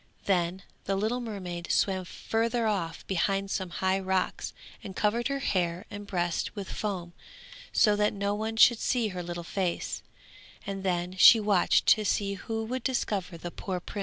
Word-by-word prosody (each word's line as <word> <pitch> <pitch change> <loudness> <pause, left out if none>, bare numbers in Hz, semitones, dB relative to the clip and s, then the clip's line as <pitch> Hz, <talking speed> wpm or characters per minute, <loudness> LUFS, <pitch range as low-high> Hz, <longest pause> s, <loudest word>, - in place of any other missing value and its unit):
Then 180 -1 +1 0.2
the 195 - 0
little 220 +5 0
mermaid 185 -7 -5
swam 190 -2 +1
further 230 +5 -1
off 185 -7 -2
behind 195 +1 0
some 190 -3 -2
high 190 +2 0
rocks 190 -1 -1 0.3
and 190 - -8
covered 230 +3 +1
her 275 0 -1
hair 180 -7 -1
and 205 0 -7
breast 175 0 -1
with 200 -2 -6
foam, 180 -5 -4 0.6
so 210 -1 +4
that 210 0 +2
no 200 0 -1
one 220 +2 -3
should 235 0 +7
see 240 -4 +1
her 180 -2 -5
little 175 0 -5
face, 180 0 -2 0.6
and 195 -1 -4
then 180 -1 -1
she 225 +5 +9
watched 205 -4 +3
to 215 - +5
see 200 -1 0
who 225 +3 -4
would 255 +3 -3
discover 195 -8 -1
the 175 +1 -6
poor 185 0 -4
prince. 190 - -7
195 Hz, 170 wpm, -28 LUFS, 180-215 Hz, 0.6 s, she